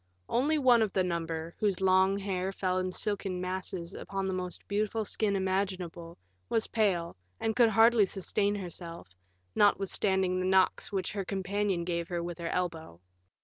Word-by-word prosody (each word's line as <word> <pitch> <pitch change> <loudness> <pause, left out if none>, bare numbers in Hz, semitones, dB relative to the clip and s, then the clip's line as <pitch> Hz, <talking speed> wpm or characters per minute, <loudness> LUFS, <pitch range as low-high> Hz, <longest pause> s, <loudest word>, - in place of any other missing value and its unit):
One 260 - +1
only 265 -6 +5
of 210 - -2
the 190 - +2
number, 165 -1 -3
whose 200 -4 +1
long 190 +1 +4
hair 190 -1 -2
fell 185 -1 -1
in 185 0 -2
silken 195 -2 -2
masses 180 -1 -4
upon 195 0 -4
the 190 - -1
most 180 -1 -5
beautiful 215 +2 -1
skin 205 0 0
imaginable, 185 -3 -2 0.3
was 225 - +1
pale, 185 -7 0 0.2
and 220 -1 -1
could 240 -2 +5
hardly 225 -1 +5
sustain 200 +2 0
herself, 170 - -7 0.4
notwithstanding 190 -2 +2
the 185 - 0
knocks 190 +2 +2
which 195 -2 -2
her 200 -2 -3
companion 195 -1 -1
gave 170 -1 -2
her 175 -1 -3
with 175 0 -6
her 170 -1 -3
elbow. 165 - -3
190 Hz, 160 wpm, -30 LUFS, 180-205 Hz, 0.4 s, only